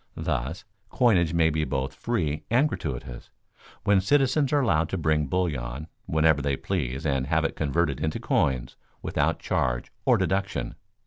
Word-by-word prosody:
Thus, 65 Hz, +9 st, -3 dB, 0.2 s
coinage 95 Hz, -10 st, +3 dB
may 85 Hz, -1 st, +3 dB
be 80 Hz, 0 st, 0 dB
both 65 Hz, -1 st, -2 dB
free 80 Hz, -6 st, -2 dB
and 125 Hz, +6 st, +4 dB
gratuitous, 60 Hz, -, -6 dB, 0.5 s
when 100 Hz, -2 st, +4 dB
citizens 135 Hz, +5 st, +2 dB
are 145 Hz, -1 st, +3 dB
allowed 85 Hz, -, +2 dB
to 95 Hz, -, -2 dB
bring 75 Hz, -3 st, +1 dB
bullion 70 Hz, -5 st, -2 dB, 0.2 s
whenever 80 Hz, -2 st, +3 dB
they 70 Hz, -1 st, 0 dB
please 70 Hz, -6 st, -3 dB
and 70 Hz, -3 st, 0 dB
have 80 Hz, +1 st, +1 dB
it -, -, -2 dB
converted 75 Hz, 0 st, 0 dB
into 80 Hz, +1 st, -2 dB
coins 65 Hz, -2 st, 0 dB, 0.3 s
without -, -, 0 dB
charge -, -, -1 dB
or -, -, +4 dB
deduction. 95 Hz, 0 st, -1 dB
80 Hz, 150 wpm, -26 LUFS, 70-95 Hz, 0.5 s, and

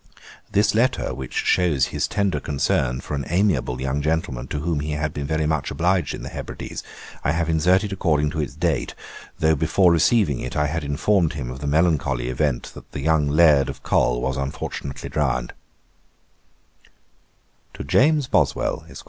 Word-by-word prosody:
This 105 Hz, +2 st, +3 dB
letter, 120 Hz, +4 st, +1 dB
which 65 Hz, -2 st, -7 dB
shows 80 Hz, -7 st, +2 dB
his -, -, 0 dB
tender 100 Hz, -2 st, 0 dB
concern 65 Hz, -3 st, 0 dB
for -, -, -7 dB
an 70 Hz, -1 st, -1 dB
amiable 85 Hz, -9 st, +1 dB
young 70 Hz, +2 st, -1 dB
gentleman 75 Hz, -5 st, -2 dB
to 75 Hz, -, -4 dB
whom 80 Hz, -1 st, -1 dB
he 75 Hz, +1 st, -3 dB
had 75 Hz, 0 st, -2 dB
been 70 Hz, -1 st, -4 dB
very 80 Hz, 0 st, 0 dB
much 75 Hz, -3 st, 0 dB
obliged 90 Hz, -2 st, 0 dB
in -, -, -9 dB
the -, -, -6 dB
Hebrides, -, -, -6 dB, 0.4 s
I 75 Hz, -, +1 dB
have 85 Hz, 0 st, -1 dB
inserted 95 Hz, +6 st, +2 dB
according 75 Hz, -5 st, +1 dB
to 80 Hz, -, -4 dB
its 75 Hz, -, -5 dB
date, -, -, -1 dB, 0.4 s
though 80 Hz, 0 st, +3 dB
before 80 Hz, +4 st, +3 dB
receiving 85 Hz, -, +3 dB
it -, -, -5 dB
I 75 Hz, -, +2 dB
had 80 Hz, +2 st, -2 dB
informed 80 Hz, +5 st, +1 dB
him 65 Hz, -5 st, -5 dB
of 65 Hz, -, -8 dB
the 70 Hz, -, -4 dB
melancholy 70 Hz, -6 st, +1 dB
event 65 Hz, -1 st, -1 dB
that -, -, -13 dB
the 70 Hz, -, -4 dB
young 80 Hz, 0 st, +2 dB
Laird 75 Hz, -3 st, +5 dB
of -, -, -8 dB
Col -, -, +2 dB
was 65 Hz, +1 st, -1 dB
unfortunately 70 Hz, 0 st, -5 dB
drowned. 65 Hz, -5 st, -1 dB, 2.2 s
'To -, -, -6 dB
JAMES 145 Hz, -, +3 dB
BOSWELL, 80 Hz, -, 0 dB
ESQ. -, -, -10 dB
75 Hz, 175 wpm, -23 LUFS, 70-85 Hz, 2.2 s, Laird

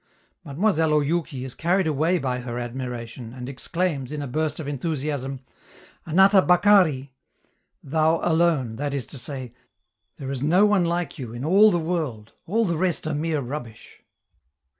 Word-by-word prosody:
Mademoiselle 160 Hz, 0 st, +1 dB
Oyouki 150 Hz, -3 st, -2 dB
is 130 Hz, -, -7 dB
carried 180 Hz, +3 st, +1 dB
away 160 Hz, +4 st, +1 dB
by 130 Hz, -5 st, -2 dB
her 120 Hz, -1 st, -5 dB
admiration, 120 Hz, -1 st, -6 dB
and 125 Hz, -1 st, -7 dB
exclaims, 140 Hz, +1 st, -2 dB
in 150 Hz, -, -4 dB
a 145 Hz, -, -3 dB
burst 155 Hz, +4 st, -2 dB
of 155 Hz, -, -5 dB
enthusiasm: 140 Hz, -2 st, -3 dB, 0.7 s
"Anata 190 Hz, +4 st, +6 dB
bakari!" 180 Hz, -8 st, +4 dB, 0.7 s
("Thou 160 Hz, +3 st, +2 dB
alone!" 160 Hz, -9 st, +1 dB
that 145 Hz, 0 st, -2 dB
is 135 Hz, -4 st, -3 dB
to 140 Hz, -, -7 dB
say: 130 Hz, -2 st, -6 dB, 0.6 s
"There 135 Hz, -2 st, -5 dB
is 135 Hz, -2 st, -4 dB
no 175 Hz, +8 st, +4 dB
one 205 Hz, -4 st, +3 dB
like 170 Hz, -2 st, -2 dB
you 120 Hz, -4 st, -6 dB
in 120 Hz, +2 st, -6 dB
the 155 Hz, -, -1 dB, 0.3 s
world, 160 Hz, -11 st, -3 dB
all 225 Hz, +6 st, +1 dB
the 170 Hz, -4 st, -1 dB
rest 175 Hz, -2 st, 0 dB
are 155 Hz, -, -1 dB
mere 155 Hz, 0 st, -1 dB
rubbish!") 120 Hz, -3 st, -8 dB
150 Hz, 155 wpm, -24 LUFS, 130-170 Hz, 0.7 s, Anata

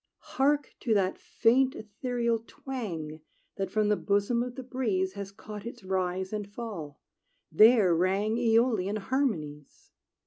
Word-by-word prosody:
Hark 285 Hz, +1 st, +2 dB
to 225 Hz, -3 st, +1 dB
that 190 Hz, -2 st, +1 dB
faint, 260 Hz, +3 st, +2 dB
ethereal 235 Hz, +2 st, -2 dB
twang 170 Hz, -, -6 dB, 0.4 s
That 195 Hz, -, -2 dB
from 215 Hz, -1 st, +1 dB
the 210 Hz, -, +4 dB
bosom 205 Hz, +4 st, +1 dB
of 245 Hz, 0 st, -4 dB
the 260 Hz, -, -6 dB
breeze 215 Hz, -8 st, -1 dB
Has 200 Hz, -1 st, -6 dB
caught 210 Hz, +1 st, -9 dB
its 235 Hz, -1 st, -8 dB
rise 185 Hz, 0 st, -2 dB
and 205 Hz, -1 st, -4 dB
fall: 200 Hz, -11 st, -7 dB, 0.5 s
there 215 Hz, +1 st, +6 dB
rang 195 Hz, +5 st, +1 dB
Æolian 225 Hz, -4 st, +2 dB
harmonies! 195 Hz, -, -3 dB
210 Hz, 135 wpm, -29 LUFS, 190-240 Hz, 0.5 s, there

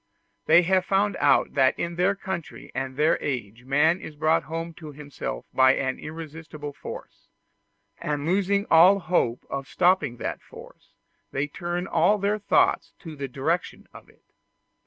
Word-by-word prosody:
They 170 Hz, +3 st, +6 dB
have 185 Hz, +1 st, +2 dB
found 200 Hz, +1 st, +1 dB
out 140 Hz, -1 st, +3 dB
that 130 Hz, -2 st, +3 dB
in 170 Hz, 0 st, -3 dB
their 185 Hz, +3 st, +2 dB
country 190 Hz, -4 st, -7 dB
and 135 Hz, 0 st, -4 dB
their 150 Hz, +2 st, +2 dB
age 120 Hz, -3 st, -4 dB
man 150 Hz, +6 st, +3 dB
is 155 Hz, -, -9 dB
brought 155 Hz, +2 st, +2 dB
home 165 Hz, +1 st, -5 dB
to 155 Hz, -2 st, -8 dB
himself 140 Hz, -, -7 dB
by 130 Hz, 0 st, +5 dB
an 130 Hz, -1 st, -2 dB
irresistible 155 Hz, -2 st, -8 dB
force; -, -, -10 dB, 0.7 s
and 145 Hz, -1 st, -3 dB
losing 200 Hz, +3 st, +1 dB
all 175 Hz, +5 st, +7 dB
hope 160 Hz, -10 st, 0 dB
of 135 Hz, -1 st, -5 dB
stopping 180 Hz, -9 st, +2 dB
that -, -, -4 dB
force, -, -, -15 dB, 0.4 s
they 135 Hz, +2 st, -1 dB
turn 175 Hz, +4 st, -4 dB
all 210 Hz, +2 st, +3 dB
their 205 Hz, +1 st, 0 dB
thoughts 205 Hz, -, +2 dB
to 160 Hz, -3 st, -9 dB
the 140 Hz, -1 st, -5 dB
direction 145 Hz, +7 st, -3 dB
of -, -, -14 dB
it. -, -, -25 dB
160 Hz, 155 wpm, -25 LUFS, 140-180 Hz, 0.7 s, all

